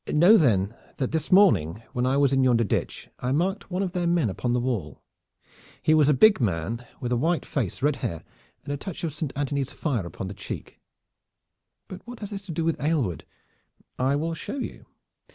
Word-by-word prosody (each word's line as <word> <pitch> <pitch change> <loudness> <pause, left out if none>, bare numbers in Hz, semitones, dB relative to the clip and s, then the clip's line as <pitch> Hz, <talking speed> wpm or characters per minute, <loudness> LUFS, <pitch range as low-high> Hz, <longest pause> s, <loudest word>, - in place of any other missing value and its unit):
Know 175 +8 +7
then 110 - +3 0.2
that 130 - -1
this 160 -1 -2
morning 115 - +4
when 125 +1 0
I 135 +2 +2
was 140 -1 +3
in 135 0 +3
yonder 120 -2 +4
ditch 100 - -2
I 125 - -2
marked 190 +8 0
one 185 +1 -1
of 185 - -2
their 175 -1 -1
men 170 - +2
upon 120 +5 -2
the 125 - +2
wall. 115 - -3 0.8
He 155 - +3
was 150 -2 +5
a - - +6
big 210 +4 +6
man 105 +3 -1 0.2
with 125 - -3
a - - +3
white 165 +7 0
face, 125 - -3
red 145 -1 +2
hair 90 -10 -4 0.4
and 145 - -4
a - - -2
touch 180 +4 -7
of 160 -4 -2
Saint 150 -2 -3
Anthony's 140 -1 -1
fire 120 - -2
upon 90 +3 -6
the 95 - -6
cheek." - - -8 1.1
"But 185 - -9
what 245 -1 -8
has 205 0 -6
this 200 0 -7
to - - -4
do 165 0 -2
with 165 -3 0
Aylward?" 145 - 0 0.7
"I 130 +2 +2
will 165 +3 -1
show 165 - -5
you. 265 - -6
140 Hz, 205 wpm, -26 LUFS, 120-170 Hz, 1.1 s, Know